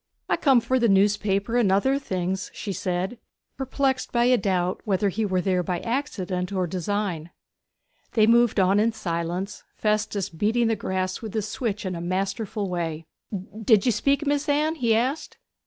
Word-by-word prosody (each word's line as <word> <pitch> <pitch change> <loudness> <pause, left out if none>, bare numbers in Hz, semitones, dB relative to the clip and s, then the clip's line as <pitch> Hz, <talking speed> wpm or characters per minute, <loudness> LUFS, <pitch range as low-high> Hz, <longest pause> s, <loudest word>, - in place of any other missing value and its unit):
'I - - +2
come 265 -5 +4
for 260 +2 +1
the 235 -2 +3
newspaper 200 +2 +2
and 220 -6 +3
other 265 +8 +2
things,' 185 -5 -3
she 200 - -4
said, 185 +5 -2 0.4
perplexed 265 0 -1
by 235 0 +2
a 250 +1 +5
doubt 185 -5 0
whether 200 0 +1
he 210 +3 -1
were 185 -2 +1
there 185 -1 +1
by 175 0 -2
accident 195 -8 -2
or 185 -2 0
design. 180 -1 -2 0.8
They 220 -3 +5
moved 235 -1 +4
on 190 +2 +4
in 225 +2 +2
silence, 175 -1 -3
Festus 210 -2 0
beating 215 +8 +1
the 225 - +2
grass 185 -2 -2
with 220 -2 -7
his 215 -1 -1
switch 210 -2 -3
in 185 - -2
a 170 - -5
masterful 195 +4 -2
way. 165 -3 -3 0.6
'Did 215 -2 +4
you 245 - +4
speak, 275 +7 +1
Mis'ess 290 +1 0
Anne?' 300 +2 +2
he 230 -2 +3
asked. 260 +7 -1
205 Hz, 170 wpm, -25 LUFS, 185-235 Hz, 0.8 s, a